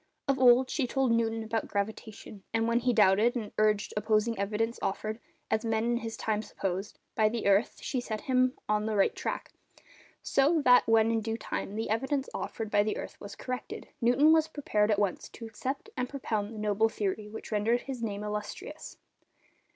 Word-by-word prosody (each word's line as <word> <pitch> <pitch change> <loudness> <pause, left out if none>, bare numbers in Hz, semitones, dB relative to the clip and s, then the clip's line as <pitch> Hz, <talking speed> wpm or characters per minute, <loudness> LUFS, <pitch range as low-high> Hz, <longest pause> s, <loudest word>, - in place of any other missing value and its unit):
Of 275 -1 +1
old, 255 0 +6
she 270 -5 0
told 265 0 +1
Newton 225 -1 +1
about 220 0 -2
gravitation, 210 0 -5
and 225 0 +2
when 235 +1 +2
he 250 +1 +1
doubted, 215 +1 +4
and 220 -4 -4
urged 215 -1 +2
opposing 215 +2 +1
evidence 220 +4 -1
offered—as 220 - -3
men 225 -1 0
in 240 0 +1
his 225 -2 -5
time 215 -1 -1
supposed—by 200 +2 -2
the 230 0 -3
earth, 200 +2 +3
she 255 - -1
set 220 -3 -4
him 255 0 +2
on 210 0 +1
the 220 - -1
right 195 - +3
track, - - -4 0.7
so 295 +4 +3
that 250 0 +6
when 225 0 +4
in 225 -1 +1
due 225 +1 -3
time 205 -2 -4
the 220 0 -2
evidence 265 +4 0
offered 220 -2 -4
by 205 - +4
the 210 +1 -1
earth - - -8
was 200 0 -8
corrected, 255 0 -6
Newton 260 +7 +5
was 320 -1 +4
prepared 220 -9 0
at 210 - +3
once 200 -3 -1
to 230 - -10
accept 255 +5 -5
and 250 0 -2
propound 220 -6 -3
the 225 - -8
noble 210 +1 +2
theory 210 0 -3
which 220 +2 -9
rendered 220 +3 +1
his 265 -3 -6
name 210 -2 -3
illustrious. 210 - -6
225 Hz, 185 wpm, -29 LUFS, 210-245 Hz, 0.7 s, old